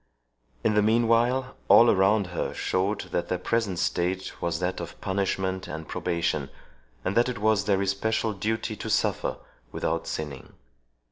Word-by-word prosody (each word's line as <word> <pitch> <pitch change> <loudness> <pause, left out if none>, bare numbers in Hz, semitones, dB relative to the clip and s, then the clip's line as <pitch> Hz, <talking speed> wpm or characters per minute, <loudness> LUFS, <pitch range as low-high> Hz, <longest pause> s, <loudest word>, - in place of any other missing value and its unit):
In 110 - +3
the 105 - +4
meanwhile, 120 +4 +2
all 115 0 +8
around 100 +2 +3
her - - -2
showed 95 +3 0
that 85 - -1
their 90 - -1
present 100 0 -1
state 90 +2 -1
was 85 -2 0
that 90 +1 -2
of - - -7
punishment 95 -1 -1
and 80 +1 -6
probation, 85 -5 -1 0.6
and 95 +2 -1
that 120 +2 +4
it 125 - -3
was 105 -1 +2
their 100 -1 +2
especial 110 +3 0
duty 110 +3 -2
to - - -5
suffer - - 0 0.3
without 85 +1 -2
sinning. 75 -4 -5
100 Hz, 150 wpm, -26 LUFS, 90-110 Hz, 0.6 s, all